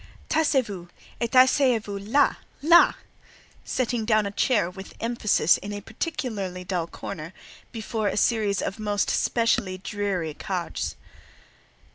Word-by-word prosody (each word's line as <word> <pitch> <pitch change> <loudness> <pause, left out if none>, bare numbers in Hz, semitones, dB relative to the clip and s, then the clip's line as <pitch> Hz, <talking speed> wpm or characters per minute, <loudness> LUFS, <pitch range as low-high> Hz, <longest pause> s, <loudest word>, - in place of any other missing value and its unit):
"Taisez 295 -5 +2
vous, 185 -5 -8 0.3
et 235 - 0
asseyez 255 -1 +5
vous 205 -2 -6
là—là!"—setting 255 -1 +1
down 215 -1 +2
a 200 - -3
chair 210 -2 +2
with 190 +2 -10
emphasis 225 -7 +2
in 205 - -7
a 205 - -4
particularly 205 - -4
dull 180 -2 -2
corner, 165 0 -7 0.4
before 220 -1 -3
a - - -1
series 210 -3 +1
of 195 - -4
most 205 -1 0
specially 230 -5 +1
dreary 190 -5 -3
"cadres." 180 +2 -4
210 Hz, 120 wpm, -25 LUFS, 190-235 Hz, 0.4 s, asseyez